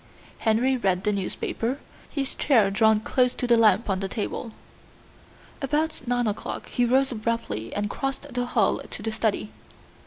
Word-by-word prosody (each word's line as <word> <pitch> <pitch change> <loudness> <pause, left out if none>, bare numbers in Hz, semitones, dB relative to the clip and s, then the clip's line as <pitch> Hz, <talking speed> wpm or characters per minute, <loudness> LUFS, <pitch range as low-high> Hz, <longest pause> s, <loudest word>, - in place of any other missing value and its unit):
Henry 230 +4 +2
read 190 -5 +1
the 210 - +2
newspaper, 225 +5 -2 0.3
his 275 -2 -2
chair 225 -9 +3
drawn 220 +1 +4
close 250 +2 +2
to - - -2
the 240 -1 +5
lamp 230 0 +4
on 195 -2 0
the 195 - -2
table. 225 +2 -3 1.1
About 300 +3 0
nine 245 0 +1
o'clock 210 -1 -4
he 245 - +1
rose 265 +3 +3
abruptly 215 - -2
and 205 0 0
crossed 270 +7 -3
the 245 0 0
hall - - +2
to - - -7
the 225 - -1
study. 215 - -1
230 Hz, 160 wpm, -25 LUFS, 205-250 Hz, 1.1 s, the